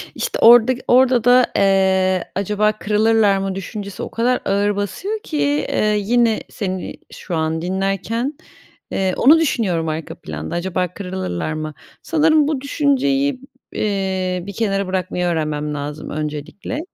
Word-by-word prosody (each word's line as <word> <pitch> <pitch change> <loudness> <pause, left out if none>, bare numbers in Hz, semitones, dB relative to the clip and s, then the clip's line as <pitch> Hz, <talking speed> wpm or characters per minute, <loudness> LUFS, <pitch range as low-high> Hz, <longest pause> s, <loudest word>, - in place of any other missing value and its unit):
İşte, - - -3
orada 240 +2 +7
ki 250 - -11
orada 250 -1 +4
da, 245 +1 +6
eee, 190 -2 +2
"Acaba 210 +2 +1
kırılırlar 215 -1 +2
mı?" 195 -1 -3
düşüncesi 200 +1 -6
o - - -5
kadar 245 +2 +1
ağır 200 +1 +1
basıyor 205 - -3
ki, 150 - -4 0.3
eee, 210 0 +1
yine 230 +1 +2
seni 190 -4 -4 0.2
şu 175 - -6
an 160 0 -1
dinlerken, 195 - -2 0.6
eee, 190 -1 0
onu 310 +5 +6
düşünüyorum 195 - 0
arka 155 0 -5
planda, 75 0 -6
"Acaba 180 +1 -1
kırılırlar 180 - -4
mı?" 155 0 -5 0.3
Sanırım 310 -2 +3
bu 295 -4 -1
düşünceyi 280 -1 +1
b - - -14 0.3
eee, 190 -3 -1
bir 200 - -7
kenara 195 -3 -1
bırakmayı 185 -1 -2
öğrenmem 155 -3 -1
lazım 145 +1 -5
öncelikle. 150 - -5
195 Hz, 140 wpm, -19 LUFS, 180-240 Hz, 0.6 s, orada